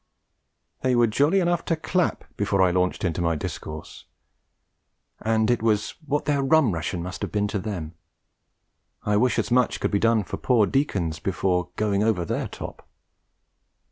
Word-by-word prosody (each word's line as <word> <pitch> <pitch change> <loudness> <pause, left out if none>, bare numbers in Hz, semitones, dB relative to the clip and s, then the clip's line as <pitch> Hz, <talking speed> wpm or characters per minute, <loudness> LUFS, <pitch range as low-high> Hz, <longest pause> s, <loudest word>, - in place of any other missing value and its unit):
They 130 -1 +2
were 120 0 +5
jolly 145 - +3
enough 175 -1 +1
to 165 - +1
clap 180 +2 0
before 100 -1 0
I 90 - +4
launched 90 0 0
into 85 -1 -1
my 85 -1 +1
discourse, 75 +1 -7 1.1
and 110 +1 +1
it 120 - +1
was 105 -2 +1 0.2
what 145 +1 0
their 145 -1 +1
rum 135 -3 +4
ration 85 +1 -3
must 90 +1 -6
have - - -3
been 105 -1 0
to 105 - -2
them. 90 -6 -5 1.1
I 105 - +1
wish 125 +3 +2
as - - -1
much 125 0 +2
could - - -1
be 100 - +2
done 115 -1 +3
for - - -6
poor 120 -5 +3
deacons 95 - -1
before 90 -2 0
going 105 -2 +1
over 105 -6 +1
their - - -2
top. - - -9
105 Hz, 170 wpm, -25 LUFS, 90-125 Hz, 1.1 s, were